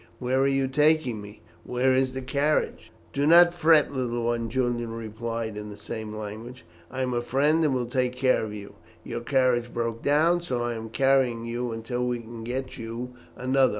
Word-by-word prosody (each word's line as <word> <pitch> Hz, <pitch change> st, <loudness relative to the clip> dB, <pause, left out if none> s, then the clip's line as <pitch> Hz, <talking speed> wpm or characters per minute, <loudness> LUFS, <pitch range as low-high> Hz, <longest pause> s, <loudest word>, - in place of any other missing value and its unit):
Where 130 Hz, +1 st, 0 dB
are 135 Hz, -, +3 dB
you 135 Hz, -1 st, +1 dB
taking 150 Hz, -4 st, +2 dB
me? 105 Hz, -3 st, -12 dB, 0.2 s
Where 130 Hz, +1 st, +1 dB
is 130 Hz, 0 st, +1 dB
the 130 Hz, 0 st, -5 dB
carriage?" 145 Hz, +3 st, 0 dB, 0.2 s
"Do 140 Hz, +2 st, +1 dB
not 175 Hz, +1 st, +7 dB
fret, 165 Hz, -4 st, +4 dB
little 120 Hz, -3 st, -2 dB
one," 115 Hz, -1 st, -1 dB
Julian 120 Hz, -1 st, -1 dB
replied 115 Hz, 0 st, -4 dB
in 105 Hz, 0 st, -6 dB
the 105 Hz, -, -9 dB
same 110 Hz, +1 st, -6 dB
language. 110 Hz, +4 st, -8 dB, 0.2 s
"I 130 Hz, +1 st, -3 dB
am 125 Hz, -1 st, -1 dB
a 120 Hz, -, 0 dB
friend, 145 Hz, +6 st, +2 dB
and 145 Hz, -4 st, +2 dB
will 125 Hz, -1 st, 0 dB
take 125 Hz, +1 st, -1 dB
care 130 Hz, -2 st, +2 dB
of 110 Hz, -, -4 dB
you. 100 Hz, -1 st, -8 dB, 0.3 s
Your 120 Hz, -, -5 dB
carriage 120 Hz, -2 st, +1 dB
broke 115 Hz, -1 st, -3 dB
down, 150 Hz, +4 st, +3 dB
and 175 Hz, -, -7 dB
so 125 Hz, -7 st, -2 dB
I 120 Hz, 0 st, -1 dB
am 115 Hz, -1 st, -6 dB
carrying 130 Hz, -2 st, +2 dB
you 120 Hz, +1 st, -3 dB
until 115 Hz, +2 st, -3 dB
we 125 Hz, -1 st, 0 dB
can 115 Hz, 0 st, -9 dB
get 130 Hz, +3 st, -4 dB
you 115 Hz, +2 st, -6 dB, 0.2 s
another. 130 Hz, +1 st, +2 dB
125 Hz, 200 wpm, -26 LUFS, 115-135 Hz, 0.3 s, not